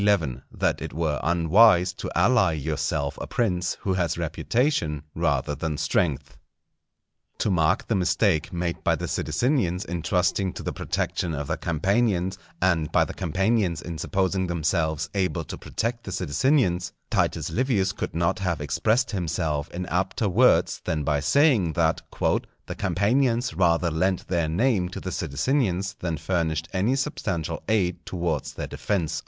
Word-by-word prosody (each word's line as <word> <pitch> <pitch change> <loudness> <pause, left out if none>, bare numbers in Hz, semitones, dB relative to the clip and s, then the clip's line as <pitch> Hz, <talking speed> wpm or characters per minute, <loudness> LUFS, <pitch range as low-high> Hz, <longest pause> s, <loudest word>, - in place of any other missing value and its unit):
—That 80 -12 0
it - - -5
were 80 -4 -1
unwise 90 +3 +4
to - - -6
ally 95 -1 +4
yourself 75 -1 -2
a - - -5
Prince 90 -7 0
who 95 - 0
has 85 -3 0
Reputation 80 - 0
rather 75 - 0
than 75 +1 -3
Strength. 70 -5 -1 1.0
To 105 - 0
mark 90 +2 +2
the - - +1
mistake 90 -3 +1
made 85 -1 -3
by - - +3
the - - -4
Sidicinians 95 - 0
in 85 -1 -4
trusting 90 +2 +1
to - - -7
the - - -3
protection 85 -3 -2
of 70 0 -3
the - - -1
Campanians, 95 +2 0 0.2
and 85 -4 +1
by - - +4
the - - -7
Campanians 95 0 0
in 85 -2 -6
supposing 95 +1 0
themselves 80 -2 0
able 90 -4 0
to - - -7
protect 115 +1 -3
the 95 - -5
Sidicinians, 90 - +1 0.2
Titus - - 0
Livius 110 -6 +1
could 100 - -5
not 85 +4 +1
have 90 -5 -1
expressed 110 - +1
himself 80 -6 -2
in 90 +1 -5
apter 95 +5 -1
words 120 +7 +3
than 80 -2 -1
by 75 0 +1
saying, 110 - +3
that - - +1
"_the - - -2
Campanians 120 +4 +1
rather 85 -2 +2
lent 90 +3 0
their 85 -3 +1
name 95 +1 +1
to - - -6
the 95 - -5
Sidicinians 95 - 0
than 85 -3 -2
furnished 80 -1 -1
any 100 +8 +2
substantial 90 - -2
aid 90 -5 +1
towards 85 -6 -2
their - - -4
defence. 80 -6 -2
90 Hz, 150 wpm, -25 LUFS, 80-100 Hz, 1.0 s, unwise